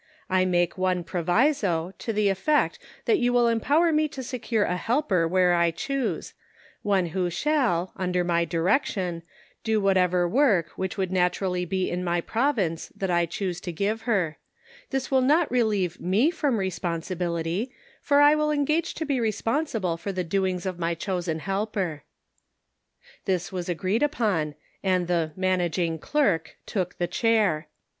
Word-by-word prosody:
I 185 0 +3
make 175 0 +1
one 185 -1 +1
proviso, 180 - +1
to 230 - -3
the 210 -2 +2
effect 245 +11 +1 0.3
that 420 -4 +3
you 245 - +2
will 245 -1 +4
empower 285 +9 +3
me 305 0 +3
to 270 -3 -7
secure 235 -3 -1
a 180 - 0
helper 195 - +1
where 180 0 +3
I 170 -1 +3
choose; 220 - -3 0.5
one 195 -3 +2
who 180 +1 -1
shall, 230 - 0
under 180 -1 0
my 170 -1 +1
direction, 175 - 0 0.4
do 220 -1 +1
whatever 180 -3 +2
work 210 - +3
which 190 +4 -3
would 190 -2 -1
naturally 180 0 0
be 185 +1 -1
in 180 +1 -2
my 175 -1 0
province 215 - -1
that 195 -2 -2
I 170 -1 +2
choose 180 0 -3
to 175 - -4
give 205 +6 -1
her; 180 -8 +1 0.5
this 270 -1 -2
will 265 -1 +4
not 300 +5 +3
relieve 210 -8 0
me 210 - +2
from 290 -8 0
respon 180 -3 -2
sibility, 175 +4 -2 0.3
for 285 -1 +4
I 290 +1 +7
will 305 0 +1
engage 300 +2 0
to 320 - -3
be 280 -3 0
responsible 225 - -1
for 200 +4 -4
the 185 -1 -2
doings 185 +1 -1
of 185 -2 -3
my 170 0 0
chosen 175 -2 -2
helper." 195 -3 -2 1.2
This 185 -2 -1
was 180 -2 -4
agreed 185 +5 0
upon, 210 - 0 0.3
and 185 -2 +1
the 170 -3 0
" - - -32
managing 175 -2 0
clerk 180 - 0
" - - -50
took 185 -3 -2
the 175 - 0
chair. 185 -5 +1
185 Hz, 165 wpm, -26 LUFS, 175-235 Hz, 1.2 s, I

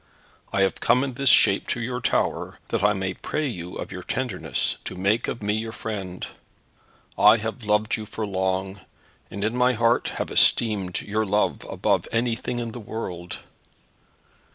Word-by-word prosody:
I 100 - +1
have 95 - 0
come 125 +3 +3
in 135 -2 -3
this 135 +1 +2
shape 100 - +5
to - - -1
your 125 +1 -3
tower - - 0
that - - 0
I 105 - +5
may 95 -2 -2
pray 155 +10 -3
you 90 -9 -5
of - - -6
your 90 - -6
tenderness 90 - -2
to - - -5
make 100 +5 +1
of 115 - -4
me 105 0 +1
your 110 +1 -2
friend. 100 -5 -5 0.9
I 105 +2 +8
have 110 +3 -5
loved 105 +1 +2
you 110 -1 -7
for 110 +1 -4
long, 95 0 -1 0.5
and 100 +1 -5
in 110 +3 0
my 125 0 +4
heart 115 +1 +2
have - - -3
esteemed 100 -6 +3
your 110 +1 -1
love 105 +2 0
above - - +1
anything 115 +1 -1
in 120 -1 -3
the 120 - -7
world. 90 -5 -5
105 Hz, 175 wpm, -25 LUFS, 95-115 Hz, 0.9 s, I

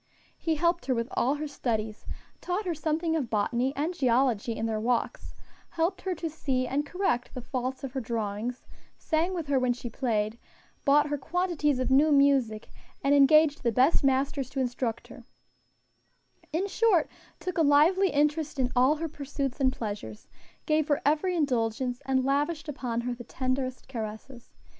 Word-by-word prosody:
He 325 -1 -1
helped 340 +1 0
her 260 - +2
with 230 0 -1
all 265 +4 +1
her 305 +1 -4
studies, 220 -6 -3 0.3
taught 370 +4 -2
her 350 - 0
something 320 +2 -1
of 275 -8 -1
botany 235 +5 0
and 310 +5 -1
geology 245 - +1
in 225 - -2
their 220 -1 -1
walks, 235 +2 -2 0.3
helped 335 +3 -1
her 375 -2 -2
to 335 0 -4
see 270 -5 -1
and 290 +3 -1
correct 315 -9 -1
the 250 - -4
faults 255 +2 -3
of 270 - -4
her 265 - -2
drawings, 225 +1 -3 0.3
sang 335 +3 0
with 335 -3 -3
her 280 -2 +2
when 250 -1 +2
she 240 -1 -7
played, 220 -3 -1 0.5
bought 295 +1 +4
her 290 -1 -2
quantities 335 -3 0
of 255 +1 -1
new 295 +4 +5
music, 275 -6 +3 0.3
and 275 +1 +3
engaged 295 +1 +5
the 235 - +1
best 260 +8 +3
masters 270 0 +1
to 270 - -4
instruct 245 -2 -2
her - - -12 1.3
in 335 +5 0
short, 405 -5 +3 0.3
took 365 -2 -3
a - - +5
lively 320 +6 +5
interest 300 0 0
in 255 -1 0
all 260 +4 +4
her 325 +2 -3
pursuits 280 -2 -4
and 260 -1 +3
pleasures, 205 - -6 0.4
gave 310 -1 +2
her 290 -2 +2
every 310 +5 +2
indulgence, 250 -4 0
and 260 -1 +2
lavished 295 +4 0
upon 245 -5 -3
her 245 +1 -2
the 240 0 -9
tenderest 255 0 -3
caresses. 235 +1 -7
275 Hz, 170 wpm, -28 LUFS, 245-310 Hz, 1.3 s, new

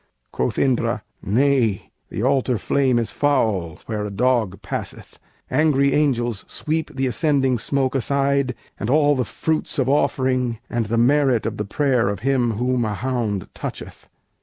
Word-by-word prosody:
Quoth 65 - -2
Indra: 130 -3 +1 0.2
"Nay, 120 -2 +1 0.2
the 105 - -4
altar 130 -2 +2
flame 130 +2 +1
is 115 -2 -1
foul 110 - 0
Where 105 -2 -3
a 105 - -3
dog 110 -2 +1
passeth; - - -6 0.3
angry 140 -3 +3
angels 120 -7 +1
sweep 155 -1 -3
The 135 0 0
ascending 135 -1 +1
smoke 135 +2 0
aside, 140 0 +1 0.2
and 105 - -3
all 145 +1 +4
the 130 - 0
fruits 160 +6 -2
Of 130 -3 +1
offering, 130 -4 +1
and 115 -2 -1
the 115 +2 0
merit 130 0 +3
of 110 -1 -3
the 105 - -2
prayer 125 0 +1
Of 100 - -4
him 125 -3 +1
whom 125 +2 0
a 105 -2 -2
hound 110 -4 -2
toucheth. - - -7
125 Hz, 155 wpm, -22 LUFS, 115-140 Hz, 0.3 s, all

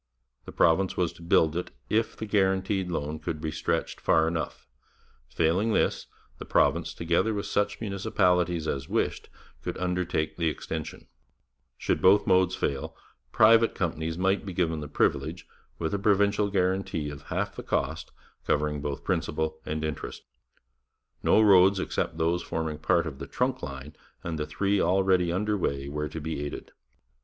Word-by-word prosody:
The - - -8
province 90 +3 +2
was 90 -2 0
to - - -16
build 80 -2 +3
it 90 - -3 0.2
if 110 +1 0
the 110 - -4
guaranteed 95 -2 +1
loan 75 -2 -3
could 80 0 -4
be 80 0 -3
stretched 80 +1 -2
far 80 0 +3
enough; 85 -1 -4 0.6
failing 90 +7 +1
this, - - +1 0.3
the - - -5
province, - - +1
together 85 +6 +1
with 100 - -3
such 105 0 0
municipalities 90 -5 +1
as 70 -2 -3
wished, - - -1 0.3
could - - -4
undertake 90 -3 -1
the 85 -2 +1
extension; 80 0 -6 0.7
should - - -1
both 100 +2 +5
modes 95 0 +3
fail, 70 -1 -3 0.4
private 115 +1 +5
companies 80 -2 -2
might 95 +2 +1
be 95 - -6
given 80 -3 0
the 75 - -6
privilege, - - 0 0.3
with 80 +1 -2
a 100 - 0
provincial 100 0 +2
guarantee 95 -5 0
of 70 - -9
half - - -2
the - - -6
cost, - - -2 0.4
covering 75 0 0
both 70 -1 -4
principal 80 0 -1
and 80 +1 -2
interest. 75 -2 -5 1.0
No - - +4
roads 95 -1 +6
except 90 - -2
those 85 +2 +1
forming 80 -2 -3
part 85 +2 +2
of 70 -4 -6
the - - -6
Trunk - - -1
line 70 +3 -7 0.3
and 80 -2 -4
the 75 - -2
three 100 0 +1
already 90 -1 +3
under 105 +4 0
way 70 -7 -2
were 75 +1 -3
to 80 - -6
be 80 -1 -4
aided. 75 - -6
85 Hz, 160 wpm, -27 LUFS, 80-95 Hz, 1.0 s, roads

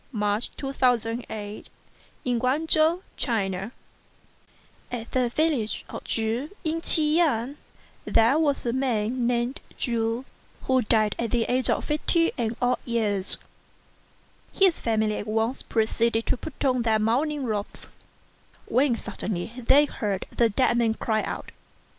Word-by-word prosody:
MR. 210 0 +1 0.2
CHU, 270 -1 -4
THE - - -19
CONSIDERATE 225 -4 -1 0.6
HUSBAND 250 - 0 1.2
AT 235 -2 -5
the 255 -2 +1
village 275 -5 0
of - - -7
Chu 230 +6 -1
in 325 0 -1
Chi 315 - +6
yang, 300 -5 +1 0.5
there 230 +7 +4
was 290 -5 +1
a 235 - 0
man 245 -2 0
named 240 +2 -1 0.2
Chu, 230 +1 -1 0.4
who 260 -1 +2
died 215 -2 +2
at 235 - -1
the 235 0 +1
age 250 +2 +2
of - - 0
fifty 330 +2 +1
and 230 -2 -2
odd 250 0 +1
years. 210 -5 +1 1.1
His 380 -3 +3
family 220 -2 0
at 205 - -5
once 225 +4 0
proceeded 225 0 0
to - - +1
put 285 +3 -6
on 255 -2 +2
their 225 -2 +2
mourning 270 +7 0
robes, 210 -4 -4 0.8
when 260 -1 +2
suddenly 205 -3 -4
they 265 +4 +4
heard 205 -8 -3
the 235 -1 +3
dead 240 +2 +2
man 225 -2 +2
cry 220 -1 0
out. - - -5
235 Hz, 135 wpm, -25 LUFS, 220-270 Hz, 1.2 s, Chi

